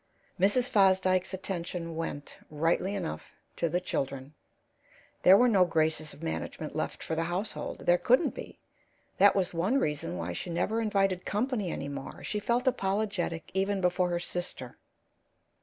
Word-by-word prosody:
Mrs. 205 Hz, +7 st, +4 dB
Fosdyke's 190 Hz, -5 st, +3 dB
attention 180 Hz, -3 st, -4 dB
went, 160 Hz, -3 st, -5 dB
rightly 165 Hz, +6 st, 0 dB
enough, 180 Hz, -5 st, -5 dB, 0.2 s
to 170 Hz, -, 0 dB
the 175 Hz, -, +1 dB
children; 135 Hz, -5 st, -3 dB, 0.9 s
there 190 Hz, +2 st, +8 dB
were 250 Hz, -, +5 dB
no 200 Hz, -6 st, +5 dB
graces 160 Hz, -2 st, +1 dB
of 145 Hz, +3 st, -13 dB
management 160 Hz, -1 st, -4 dB
left 155 Hz, -, -3 dB
for -, -, -3 dB
the 165 Hz, +1 st, 0 dB
household 185 Hz, +5 st, -4 dB
there 175 Hz, 0 st, +4 dB
couldn't 255 Hz, +7 st, +3 dB
be; -, -, -9 dB, 0.6 s
that 200 Hz, +1 st, +7 dB
was 185 Hz, -3 st, +1 dB
one 185 Hz, +10 st, +1 dB
reason 145 Hz, -, -1 dB
why 85 Hz, +1 st, -3 dB
she 130 Hz, -, -5 dB
never 180 Hz, +7 st, 0 dB
invited 195 Hz, -4 st, +1 dB
company 215 Hz, -3 st, -1 dB
any 140 Hz, -, -4 dB
more. 140 Hz, -1 st, -7 dB
She 210 Hz, -, -2 dB
felt 235 Hz, +4 st, 0 dB
apologetic 195 Hz, -6 st, -1 dB
even 195 Hz, +1 st, 0 dB
before 180 Hz, 0 st, +1 dB
her 175 Hz, 0 st, 0 dB
sister. 175 Hz, -8 st, -5 dB
180 Hz, 155 wpm, -29 LUFS, 165-200 Hz, 0.9 s, there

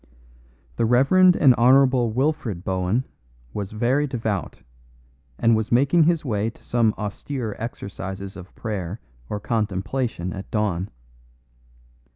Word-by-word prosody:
The 115 Hz, -, +2 dB
Rev. 125 Hz, +4 st, +3 dB
and 180 Hz, -7 st, +6 dB
Hon. 130 Hz, +3 st, +7 dB, 0.3 s
Wilfred 130 Hz, -, -1 dB
Bohun 95 Hz, +5 st, 0 dB, 0.5 s
was 100 Hz, -2 st, -4 dB
very 125 Hz, +7 st, +1 dB
devout, 110 Hz, -7 st, -3 dB, 0.7 s
and 115 Hz, 0 st, +3 dB
was 110 Hz, 0 st, -2 dB
making 140 Hz, +7 st, +4 dB
his 165 Hz, -2 st, +1 dB
way 110 Hz, -3 st, 0 dB
to -, -, -17 dB
some 115 Hz, -3 st, +1 dB
austere 110 Hz, +2 st, -4 dB
exercises 100 Hz, -3 st, -6 dB
of 90 Hz, 0 st, -12 dB
prayer 100 Hz, -3 st, -4 dB, 0.3 s
or 105 Hz, -, -3 dB
contemplation 105 Hz, -2 st, -2 dB
at 95 Hz, 0 st, -8 dB
dawn. 100 Hz, -3 st, -1 dB
110 Hz, 120 wpm, -23 LUFS, 100-130 Hz, 0.7 s, Hon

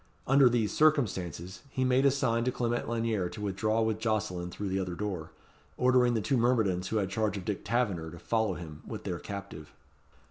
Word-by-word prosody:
Under 135 Hz, -1 st, +6 dB
these 115 Hz, -3 st, +1 dB
circumstances 95 Hz, -, +1 dB
he 130 Hz, -, -1 dB
made 130 Hz, +2 st, +4 dB
a -, -, +7 dB
sign 130 Hz, -4 st, +1 dB
to 125 Hz, -, +2 dB
Clement 120 Hz, -1 st, -1 dB
Lanyere 115 Hz, -6 st, 0 dB
to 105 Hz, -, -9 dB
withdraw 110 Hz, +3 st, 0 dB
with 110 Hz, -1 st, 0 dB
Jocelyn 100 Hz, -6 st, -1 dB
through 100 Hz, +2 st, -4 dB
the 95 Hz, +1 st, 0 dB
other 90 Hz, -2 st, -3 dB
door, 95 Hz, -5 st, -4 dB, 0.5 s
ordering 125 Hz, -1 st, +4 dB
the 110 Hz, -, +1 dB
two 135 Hz, +5 st, +1 dB
myrmidons 110 Hz, -7 st, +2 dB
who 110 Hz, -, -1 dB
had 95 Hz, -3 st, -1 dB
charge 105 Hz, 0 st, 0 dB
of 95 Hz, -, -7 dB
Dick 105 Hz, -3 st, -3 dB
Taverner 100 Hz, -10 st, 0 dB
to 85 Hz, -, -10 dB
follow 110 Hz, +2 st, 0 dB
him 80 Hz, -4 st, -9 dB
with -, -, -6 dB
their -, -, -3 dB
captive. 90 Hz, -7 st, -8 dB
110 Hz, 200 wpm, -30 LUFS, 95-120 Hz, 0.5 s, a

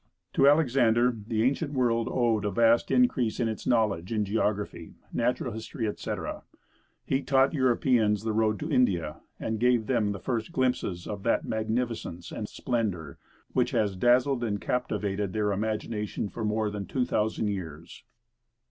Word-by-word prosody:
To 135 Hz, -, +4 dB
Alexander, 125 Hz, -5 st, +4 dB
the 110 Hz, -2 st, 0 dB
ancient 145 Hz, +4 st, 0 dB
world 120 Hz, -3 st, +1 dB
owed 115 Hz, -4 st, +1 dB
a 105 Hz, -, 0 dB
vast 115 Hz, +3 st, +3 dB
increase 130 Hz, -, +2 dB
of 120 Hz, -, +1 dB
its 110 Hz, -1 st, -5 dB
knowledge 105 Hz, -7 st, +1 dB
in 105 Hz, -2 st, 0 dB
geography, 105 Hz, 0 st, -2 dB, 0.2 s
natural -, -, 0 dB
history, 110 Hz, +2 st, -4 dB
etc. 105 Hz, -, -4 dB, 0.6 s
He 135 Hz, -, 0 dB
taught 135 Hz, +1 st, +3 dB
Europeans 120 Hz, -6 st, +2 dB
the 110 Hz, -1 st, -1 dB
road 110 Hz, -1 st, +1 dB
to 155 Hz, +2 st, -3 dB
India, 90 Hz, -, +1 dB, 0.2 s
and 110 Hz, -1 st, -2 dB
gave 120 Hz, -1 st, +3 dB
them 110 Hz, -5 st, +1 dB
the 100 Hz, -, -4 dB
first 115 Hz, -, -3 dB
glimpses 125 Hz, -, -1 dB
of 100 Hz, -2 st, -5 dB
that 115 Hz, -, +1 dB
magnificence 110 Hz, -5 st, -3 dB
and 105 Hz, -, -5 dB
splendor 100 Hz, -, -3 dB, 0.3 s
which -, -, +2 dB
has 100 Hz, -3 st, +1 dB
dazzled 125 Hz, +5 st, +3 dB
and 105 Hz, -3 st, -1 dB
captivated 105 Hz, -5 st, -2 dB
their 105 Hz, -1 st, 0 dB
imagination 105 Hz, 0 st, -2 dB
for 115 Hz, -, -6 dB
more 105 Hz, 0 st, 0 dB
than 100 Hz, -2 st, -5 dB
two 130 Hz, -2 st, 0 dB
thousand 110 Hz, -1 st, 0 dB
years. 85 Hz, -4 st, -7 dB
110 Hz, 155 wpm, -28 LUFS, 105-125 Hz, 0.6 s, To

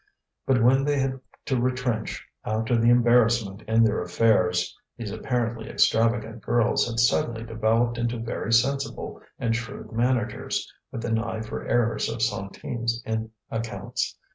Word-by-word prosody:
But 125 Hz, -4 st, +3 dB
when 135 Hz, +3 st, +5 dB
they 145 Hz, 0 st, +1 dB
had 135 Hz, -1 st, 0 dB, 0.3 s
to 130 Hz, -3 st, 0 dB
retrench 125 Hz, -3 st, -1 dB, 0.2 s
after 110 Hz, +3 st, 0 dB
the 115 Hz, 0 st, +4 dB
embarrassment 120 Hz, -4 st, +4 dB
in 110 Hz, +1 st, +4 dB
their 110 Hz, -1 st, +2 dB
affairs, 90 Hz, -1 st, +2 dB, 0.2 s
these 110 Hz, -3 st, -5 dB
apparently 115 Hz, -2 st, -2 dB
extravagant 115 Hz, 0 st, +2 dB
girls 120 Hz, -1 st, +2 dB
had 115 Hz, -1 st, -2 dB
suddenly 120 Hz, -1 st, +2 dB
developed 115 Hz, +1 st, +1 dB
into 120 Hz, 0 st, -1 dB
very 115 Hz, -1 st, -3 dB
sensible 135 Hz, +4 st, 0 dB, 0.2 s
and 115 Hz, -1 st, 0 dB
shrewd 115 Hz, -1 st, -6 dB
managers, 120 Hz, -1 st, 0 dB, 0.2 s
with 115 Hz, -, -5 dB
an 115 Hz, -1 st, +1 dB
eye 115 Hz, -1 st, -3 dB
for 110 Hz, -, -6 dB
errors 115 Hz, -1 st, +1 dB
of 110 Hz, -, -2 dB
centimes 115 Hz, +2 st, -2 dB
in 110 Hz, 0 st, -2 dB, 0.2 s
accounts. 115 Hz, 0 st, -3 dB
115 Hz, 140 wpm, -26 LUFS, 110-120 Hz, 0.3 s, when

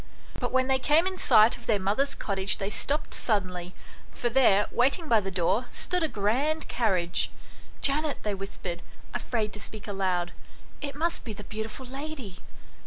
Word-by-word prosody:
But 245 Hz, -, -2 dB
when 260 Hz, 0 st, +3 dB
they 265 Hz, 0 st, +2 dB
came 305 Hz, +6 st, +4 dB
in 375 Hz, 0 st, -2 dB
sight 215 Hz, +2 st, +6 dB
of 240 Hz, -, -15 dB
their 215 Hz, -, +3 dB
mother's 210 Hz, +9 st, +1 dB
cottage 195 Hz, -1 st, 0 dB
they 195 Hz, +1 st, -3 dB
stopped 290 Hz, +8 st, -1 dB
suddenly, 185 Hz, -5 st, 0 dB, 0.4 s
for 240 Hz, -, -1 dB
there, 230 Hz, -5 st, +5 dB
waiting 275 Hz, +7 st, +2 dB
by 230 Hz, -5 st, +5 dB
the 195 Hz, -2 st, -3 dB
door, 190 Hz, +6 st, +1 dB
stood 360 Hz, 0 st, 0 dB
a 320 Hz, -, +2 dB
grand 275 Hz, +8 st, 0 dB
carriage. 185 Hz, -7 st, +1 dB, 0.3 s
" -, -, -22 dB
Janet," 295 Hz, +1 st, +2 dB
they 210 Hz, -, 0 dB
whispered, 190 Hz, -3 st, -5 dB, 0.3 s
afraid 220 Hz, -4 st, -2 dB
to 210 Hz, -, -8 dB
speak 215 Hz, +1 st, -7 dB
aloud, 185 Hz, -3 st, -1 dB, 0.5 s
"it 280 Hz, -2 st, -4 dB
must 335 Hz, +3 st, -1 dB
be 225 Hz, -, -5 dB
the 210 Hz, -, -9 dB
beautiful 220 Hz, +5 st, -6 dB
lady." 270 Hz, -7 st, -7 dB
220 Hz, 175 wpm, -28 LUFS, 195-275 Hz, 0.5 s, sight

